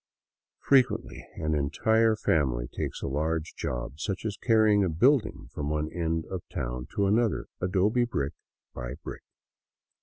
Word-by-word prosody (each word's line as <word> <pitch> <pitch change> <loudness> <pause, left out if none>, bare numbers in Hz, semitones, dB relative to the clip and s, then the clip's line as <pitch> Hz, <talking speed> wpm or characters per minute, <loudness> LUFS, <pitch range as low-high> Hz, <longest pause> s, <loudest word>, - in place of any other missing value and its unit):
Frequently 65 - +2
an 80 0 -1
entire 110 +10 +2
family 65 - +1
takes - - -5
a - - -1
large 80 +3 -1
job, 65 +4 -4
such 95 +4 -3
as 105 -2 -2
carrying 110 -3 +4
a 95 - +1
building 120 - +2
from 75 0 -3
one 75 0 -1
end 80 -2 -1
of 95 -2 -5
town 60 +1 -4
to 100 - +2
another, 110 +2 +2 0.2
adobe 100 +6 +2
brick 70 - -2 0.4
by - - -5
brick. - - -7
80 Hz, 145 wpm, -28 LUFS, 70-110 Hz, 0.4 s, carrying